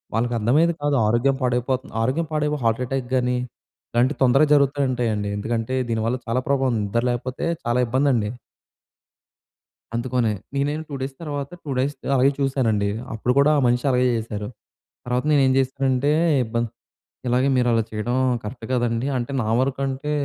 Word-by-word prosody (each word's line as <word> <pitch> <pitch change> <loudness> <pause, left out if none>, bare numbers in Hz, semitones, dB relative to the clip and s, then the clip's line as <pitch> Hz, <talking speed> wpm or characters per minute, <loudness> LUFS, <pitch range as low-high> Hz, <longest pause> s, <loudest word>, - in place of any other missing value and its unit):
వాళ్ళకి 120 +2 0
అర్థమయ్యేది 150 +10 +3
కాదు, 145 -1 +1
ఆరోగ్యం 120 +5 +2
పాడైపోతుంది, 125 +2 -1
ఆరోగ్యం 135 +8 0
పాడైపో‌ 150 -1 0
హార్ట్ 115 +2 +2
అటాక్‌గాని, 125 -1 0 0.6
ఇలాంటివి 125 +3 +2
తొందరగా 135 +4 +5
జరుగుతూ 140 0 +3
ఉంటాయండి 110 -5 -1
ఎందుకంటే, 115 +3 -2
దీని 110 -1 0
వల్ల 125 - 0
చాలా 115 +3 0
ప్రభావం 135 -2 +2
ఉంది 110 - 0
నిద్ర 115 +4 0
లేకపోతే 125 +5 -3 0.2
చాలా 120 +1 +1
ఇబ్బందండి. 125 -4 +1 1.7
అందుకొనే, 120 -2 0 0.2
నేనే‌న్న 145 +3 -1
2 145 - -4
డేస్ 135 +1 -4
తర్వాత, 145 -3 -4
2 145 - -5
డేస్ 140 +3 0 0.2
అలాగే 135 +1 +4
చూసానండి. 125 -7 +1 0.3
అప్పుడు 120 +3 0
కూడా 140 +2 +5
ఆ - - +3
మనిషి 120 +2 +1
అలాగే 125 0 +3
చేశారు. 105 -2 -4 0.6
తర్వాత 125 +2 -1
నేను 145 -2 +4
ఏం 130 - +3
చేశానంటే, 135 +1 +1 0.3
ఇబ్బ 110 +1 -6 0.7
ఇలాగే 125 +3 +2
మీరు 125 -1 +2
అలా 115 -1 +3
చేయడం 110 +3 -2 0.3
కరెక్ట్ 115 +4 -7
కదండీ. 120 0 0
అంటే 125 +2 -3
నా 110 - -2
వరకు 135 0 -1
అంటే 135 +3 -3
125 Hz, 155 wpm, -23 LUFS, 120-140 Hz, 1.7 s, తొందరగా